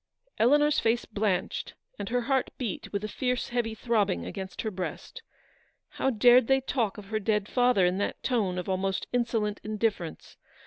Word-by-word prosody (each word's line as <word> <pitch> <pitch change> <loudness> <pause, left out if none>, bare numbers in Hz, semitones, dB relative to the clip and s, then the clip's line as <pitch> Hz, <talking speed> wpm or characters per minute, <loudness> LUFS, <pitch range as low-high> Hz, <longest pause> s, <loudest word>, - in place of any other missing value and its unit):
Eleanors 295 +5 +4
face 230 +2 +1
blanched, 205 -4 -2 0.2
and - - -4
her 245 +1 +1
heart 265 +1 +1
beat 235 -7 -4
with 200 0 -2
a - - -1
fierce 250 +3 -2
heavy 235 -2 -1
throbbing 210 - 0
against 190 -1 -6
her 220 - -2
breast. 190 - -6 0.7
How 265 - -1
dared 245 0 +6
they 270 0 +4
talk 235 -6 -1
of 200 -1 -10
her 215 -1 0
dead 210 -1 0
father 245 -7 +3
in 180 +2 +1
that 205 - -3
tone 210 -8 0
of 180 - -4
almost 190 0 -1
insolent 225 -4 0
indifference. 210 -6 -3
220 Hz, 170 wpm, -28 LUFS, 195-245 Hz, 0.7 s, dared